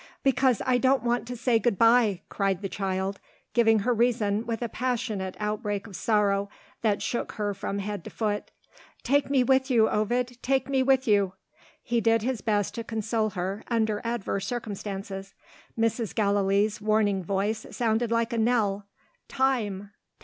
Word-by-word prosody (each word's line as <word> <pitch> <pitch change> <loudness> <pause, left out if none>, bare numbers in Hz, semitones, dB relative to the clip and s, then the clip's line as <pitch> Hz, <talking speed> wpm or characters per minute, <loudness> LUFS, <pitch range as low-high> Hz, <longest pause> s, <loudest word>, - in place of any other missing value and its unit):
"Because 265 -3 +3
I 250 -1 +3
don't 260 -1 +3
want 240 -1 0
to 245 0 -5
say 235 -1 +2
good 225 -2 +1
bye!" 230 -4 +4
cried 195 -1 -1
the - - 0
child, 190 0 -2 0.3
giving 225 -3 +4
her 245 - +3
reason 225 -2 +1
with 230 0 -2
a - - -1
passionate 220 -6 -2
outbreak 210 -1 -2
of 205 -4 -10
sorrow 200 -2 +1 0.3
that 210 -3 +1
shook 240 - -2
her 205 -2 -2
from 200 +1 -4
head 200 -2 -4
to - - -6
foot. 210 -2 -2 0.5
"Take 280 +2 +2
me 270 -2 +3
with 265 +2 +2
you, 225 -4 +4
Ovid, 245 +3 -1
take 265 0 +1
me 270 -1 +1
with 265 -1 +3
you!" 200 -3 +3 0.5
He 235 -1 0
did 225 -1 +3
his 255 -1 -1
best 205 -3 0
to 230 - -4
console 220 0 -1
her, 190 +4 -3
under 220 -3 0
adverse 225 -4 -2
circumstances. 195 -4 -5 0.4
Mrs. 225 -1 0
Gallilee's 200 0 +1
warning 210 -2 +2
voice 200 +4 -1
sounded 230 0 0
like 230 0 0
a 230 - 0
knell 210 -4 +1 0.4
"Time! 215 -7 -1
220 Hz, 165 wpm, -27 LUFS, 200-240 Hz, 0.5 s, bye